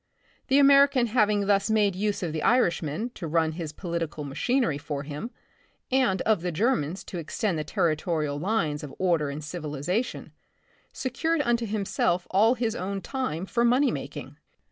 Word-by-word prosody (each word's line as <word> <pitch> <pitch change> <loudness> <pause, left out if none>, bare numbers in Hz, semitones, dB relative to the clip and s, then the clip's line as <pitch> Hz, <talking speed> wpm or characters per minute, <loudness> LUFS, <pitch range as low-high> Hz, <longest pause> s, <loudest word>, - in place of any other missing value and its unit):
The 270 - +4
American 280 -2 +6
having 210 -3 +2
thus 200 +1 +2
made 210 -3 +2
use 205 0 -1
of 165 -3 -2
the 155 - -2
Irishmen 180 - +1
to 170 - -6
run 160 0 +1
his 160 -1 -5
political 165 -2 -4
machinery 150 - 0
for 145 -1 -4
him, 150 +10 -6 0.6
and 255 -8 +2
of 215 -6 +2
the 180 0 -2
Germans 185 - 0
to 180 - -6
extend 170 +2 -2
the - - -2
territo 160 +2 0
rial 145 -1 -2
lines 165 -5 0
of 145 - -8
order 170 -6 +1
and 145 +2 -6
civilization, 155 - -3 0.6
secured 295 +5 -1
unto 235 -2 +1
himself 195 -4 0
all 220 +6 +4
his 230 -2 -1
own 195 +2 -3
time 190 - -3
for 235 +4 0
money 250 +4 +4
making. - - -7
190 Hz, 165 wpm, -26 LUFS, 155-235 Hz, 0.6 s, American